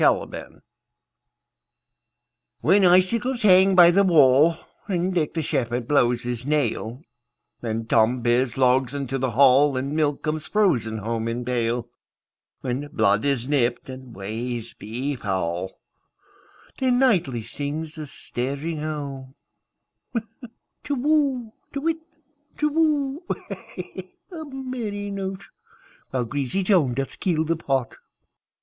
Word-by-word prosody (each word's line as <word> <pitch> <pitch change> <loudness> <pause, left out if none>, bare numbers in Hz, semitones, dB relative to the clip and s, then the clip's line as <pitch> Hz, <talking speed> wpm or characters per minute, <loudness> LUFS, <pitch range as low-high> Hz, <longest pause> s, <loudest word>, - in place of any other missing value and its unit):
Winter - - 0 2.0
WHEN 190 - +4
icicles 230 +8 +3
hang 190 -1 +6
by 175 -1 +8
the 200 +3 +4
wallAnd 170 +4 +3
Dick 165 -3 -1
the 160 - -1
shepherd 120 -3 -1
blows 125 -4 +2
his 120 -1 -4
nail, 135 -3 -1 0.6
And 115 -1 -3
Tom 120 +2 +3
bears 120 +1 +1
logs 130 0 +2
into 135 -1 -3
the 130 0 0
hall, 135 +3 +5
And 135 +3 -2
milk 150 -2 0
comes 155 0 -2
frozen 125 - +1
home 115 +1 -3
in 120 +1 -3
pail; 120 -1 -1 0.7
When 130 +3 -3
blood 105 -8 +1
is 135 -3 0
nipt, 130 -4 0
and 130 -2 -9
ways 115 +4 -5
be 125 +7 -4
foul, 95 -4 -3 1.0
Then 255 -2 +2
nightly 175 - +2
sings 150 +5 -4
the 155 -2 -6
staring 140 +6 -4
owlTu 140 -4 -5 1.6
whoo! 270 -5 +1 0.2
To 280 - -2
whit, 325 +2 -1 0.6
Tu 300 - +1
whoo! 300 -1 +1 1.1
A 320 -3 -7
merry 245 -7 -5
note! 195 -1 -5 0.6
While 125 -2 -1
greasy 140 +8 -2
Joan 170 - +3
doth 135 +1 -4
keel 165 -5 +1
the 165 +1 +1
pot. 135 -6 -2
145 Hz, 115 wpm, -24 LUFS, 120-190 Hz, 2.0 s, by